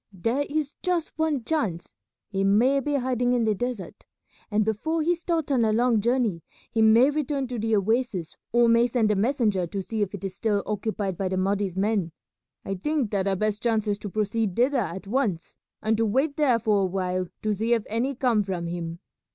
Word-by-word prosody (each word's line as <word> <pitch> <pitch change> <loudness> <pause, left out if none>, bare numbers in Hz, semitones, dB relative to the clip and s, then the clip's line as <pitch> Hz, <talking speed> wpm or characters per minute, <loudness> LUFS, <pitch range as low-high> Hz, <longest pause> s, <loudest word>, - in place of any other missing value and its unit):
There 230 +10 -1
is 295 -1 -2
just 355 -3 -1
one 310 -5 0
chance, 220 - -2 0.4
he 195 -1 0
may 235 +8 +4
be 290 +2 -1
hiding 250 -2 +1
in 245 -2 +2
the 220 -1 +2
desert, 245 -2 -5 0.4
and 215 -1 +1
before 315 +10 -1
he 345 +3 +3
starts 330 -3 -2
on 250 -4 +3
a 220 - +2
long 230 0 +2
journey 235 -6 +1 0.3
he 225 - +1
may 230 +5 +6
return 290 -2 -1
to 245 -2 -3
the 225 0 +1
oasis 210 -4 0 0.2
or 240 0 +4
may 230 +1 +5
send 230 -3 +1
a - - +2
messenger 210 -5 +1
to 195 - -4
see 220 +2 -3
if 200 0 -1
it 200 - -10
is 190 -1 -5
still 205 -1 0
occupied 205 -3 -3
by 190 -1 0
the 185 - -1
Mahdi's 195 -1 0
men. 195 -4 0 0.5
I 195 - -2
think 265 +4 -1
that 200 -2 0
our 195 - +2
best 215 +2 -1
chance 225 -2 +1
is 205 -1 0
to 205 - -6
proceed 210 -1 -1
thither 260 +4 +2
at 190 -3 -4
once, 205 -6 -1 0.3
and 220 +1 +2
to 225 - +2
wait 270 +7 +1
there 275 -6 +3
for 215 -3 +2
a - - +2
while 185 -1 -2 0.2
to 215 -1 +1
see 225 +4 +1
if 225 - -2
any 245 +6 -1
come 240 -4 +2
from 185 -4 -3
him. 170 -1 -4
220 Hz, 210 wpm, -26 LUFS, 195-255 Hz, 0.5 s, may